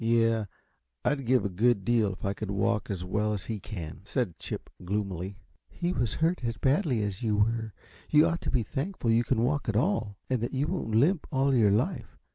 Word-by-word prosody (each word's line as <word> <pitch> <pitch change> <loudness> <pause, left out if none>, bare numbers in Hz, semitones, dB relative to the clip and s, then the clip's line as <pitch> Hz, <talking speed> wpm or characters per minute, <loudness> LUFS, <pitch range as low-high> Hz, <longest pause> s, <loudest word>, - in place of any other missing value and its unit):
"Yes; 115 -2 +2 0.6
I'd 140 -4 0
give 125 -2 +3
a - - +1
good 100 +1 +2
deal 115 -4 +3
if - - -8
I 100 - +1
could 110 0 -5
walk 105 +1 0
as 95 -3 -3
well 105 +3 0
as 95 -3 -4
he 110 0 -3
can," 85 -6 -7
said 100 - -2
Chip, - - -6
gloomily. 95 -1 -3 0.3
"He 175 +1 -2
wasn't 120 - -1
hurt 170 -3 +1
as 115 -2 -2
badly 135 - +2
as 100 0 -3
you 110 -3 +1
were. 110 +1 +1 0.4
You 150 +1 +6
ought 170 0 0
to - - -3
be 125 -4 +1
thankful 140 - -2
you 115 +1 +4
can 115 -1 +1
walk 140 0 0
at 110 - -1
all, 115 - +1
and 130 -3 0
that 120 +3 -2
you 135 +2 +1
won't 155 -11 -2
limp 150 - +3
all 135 -1 +2
your 115 -5 +5
life. 120 - -1
115 Hz, 215 wpm, -29 LUFS, 105-135 Hz, 0.6 s, You